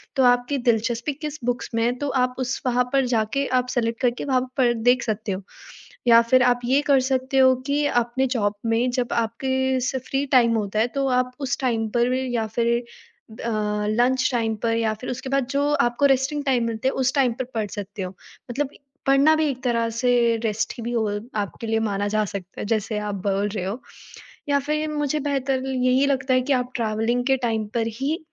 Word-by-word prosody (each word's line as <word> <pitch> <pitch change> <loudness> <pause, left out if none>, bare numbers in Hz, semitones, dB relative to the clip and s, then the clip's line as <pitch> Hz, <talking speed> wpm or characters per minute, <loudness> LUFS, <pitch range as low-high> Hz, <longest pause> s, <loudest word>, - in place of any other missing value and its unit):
तो 265 - +3
आपकी 245 +3 +3
दिलचस्पी 235 +4 0
किस 300 +1 -6
बुक्स 245 0 -2
में 230 - +1
है 240 - +2
तो 285 - -2
आप 250 0 -1
उस 255 0 -2
वहाँ 250 0 +2
पर 270 -1 +3
जाके 225 +6 0 0.2
आप 250 - -12
सेलेक्ट 230 -1 -1
करके 245 -2 0
वहाँ 260 -3 +2 0.2
पर 245 -3 +4
देख 245 +2 +2
सकते 215 -1 -2
हो। 190 +1 -3 0.7
या 230 -1 +8
फिर 255 -1 +6
आप 245 -1 +3
ये 265 +4 +3
कर 275 -2 +5
सकते 260 +1 0
हो 260 -1 +6
कि 290 +1 +1 0.2
अपने 240 +3 -1
जॉब 215 -5 0
में 230 +2 +1
जब 245 -1 -1
आपके 230 +3 -1 0.2
जैसे 260 0 0
फ्री 275 +1 0
टाइम 235 -3 +5
होता 210 -1 -2
है 220 - +3
तो 275 -1 0
आप 250 0 -3
उस 265 -3 -1
टाइम 230 -4 0
पर 240 +1 +2
या 245 -3 -1
फिर 235 0 +2 0.7
अ, 235 - -1 0.4
लंच 250 +4 +2
टाइम 225 -2 0
पर 230 -1 +1
या 225 -1 0
फिर 255 - -5
उसके 265 +2 -5
बाद 275 -2 +1
जो 285 +1 +1
आपको 240 +3 +2
रेस्टिंग 285 +3 -2
टाइम 255 -4 +2
मिलते 230 +2 -1
है - - 0
उस 260 - +1
टाइम 265 -4 +3
पर - - 0
पढ़ 220 -2 -1
सकते 205 0 -6
हो 185 0 -5 0.4
मतलब 275 +3 -2 0.4
पढ़ना 275 +3 +5
भी 315 - +1
एक 260 -2 -4
तरह 230 -2 +1
से 230 +3 -1 0.4
रेस्ट 220 0 -1
ही 235 - -7
भी 235 +1 -3
हुआ 220 -3 0 0.3
आपके 205 +3 -5
लिए 225 0 +1
माना 205 -2 -1
जा 215 +1 +1
सकता 195 -2 -7
है - - -3
जैसे 215 0 -1
आप - - -3
बोल 200 +1 +1
रहे 200 -3 -4
हो 200 +7 -4 0.7
या 285 0 +3
फिर 305 +1 0
मुझे 295 0 -1
बेहतर 270 -2 -1
यही 260 +1 +2
लगता 270 -1 +1
है 255 - +4
कि 280 - 0
आप 250 -1 0
ट्रैवलिंग 230 +1 0
के 270 -1 +4
टाइम 220 -2 -1
पर 230 -1 +1
ही 295 +4 0
245 Hz, 215 wpm, -23 LUFS, 225-265 Hz, 0.7 s, या